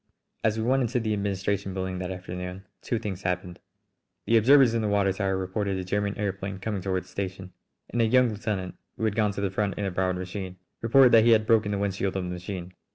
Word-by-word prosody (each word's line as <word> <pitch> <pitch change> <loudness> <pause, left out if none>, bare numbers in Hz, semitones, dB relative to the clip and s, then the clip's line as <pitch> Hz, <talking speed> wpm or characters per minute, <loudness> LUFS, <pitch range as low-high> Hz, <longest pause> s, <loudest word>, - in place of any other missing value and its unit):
As 110 0 +2
we 110 - -1
went 130 +3 +2
into 125 +1 0
the 110 -2 -1
administration 100 -1 -2
building 95 -1 -3
that 90 -1 -4
afternoon 90 +1 -6 0.2
two 120 - -1
things 100 -4 -5
happened: 90 -1 -3 0.7
The 115 - +3
observers 125 +2 +6
in 115 - +1
the 110 - 0
water 100 -2 +2
tower 95 -1 -1
reported 95 +1 -2
a 95 - -3
German 100 +2 -1
aëroplane 100 -2 -3
coming 100 -1 -3
toward 95 -1 -1
the - - -22
station, 95 -1 -5 0.3
and 120 - -1
a - - +4
young 125 +1 +4
lieutenant, 100 -4 -3 0.2
who 110 - -1
had 105 -2 0
gone 105 -2 +2
to 100 - -4
the 100 -2 -1
front 100 +1 -1
in 100 - -2
a 95 - -1
borrowed 90 0 0
machine, 95 0 -6 0.2
reported 125 +2 +6
that 115 -1 +7
he 115 0 +6
had 110 -1 +3
broken 110 -2 +3
the 100 - -1
wind 100 -1 -1
shield 95 0 -2
of 95 - -2
the 90 - -4
machine. 90 0 -6
100 Hz, 235 wpm, -27 LUFS, 95-110 Hz, 0.7 s, that